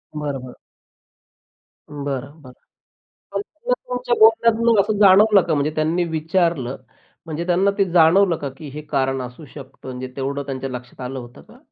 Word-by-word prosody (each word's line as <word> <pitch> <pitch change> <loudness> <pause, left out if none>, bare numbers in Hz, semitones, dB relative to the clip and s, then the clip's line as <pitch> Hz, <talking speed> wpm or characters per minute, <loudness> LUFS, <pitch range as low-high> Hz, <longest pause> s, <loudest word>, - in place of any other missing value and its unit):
बरं, 145 -2 -3
बरं. 125 -1 -10 1.3
बरं, 140 0 -5
बरं. 130 -3 -13 0.8
पण - - -1
ते 475 +4 -7
तुमच्या - - -2
बोलण्यातून 230 - +4
असं 210 +1 -2
जाणवलं 200 +1 +6
का? 170 - -1
म्हणजे 145 +1 0
त्यांनी 160 +3 +1
विचारलं 160 -4 0 0.5
म्हणजे 165 +1 -4
त्यांना 185 +3 +2
ते 200 - +3
जाणवलं 175 +2 +5
का? 140 - -5
की 155 - -9
हे 150 +3 -7
कारण 135 -2 0
असू 125 +5 -9
शकतं. 135 -2 -12
म्हणजे 130 0 -6
तेवढं 140 +1 -3
त्यांच्या 135 -1 -4
लक्षात 125 0 -9
आलं 130 +1 -5
होतं 120 0 -12
का? - - -18
155 Hz, 160 wpm, -21 LUFS, 135-195 Hz, 1.3 s, जाणवलं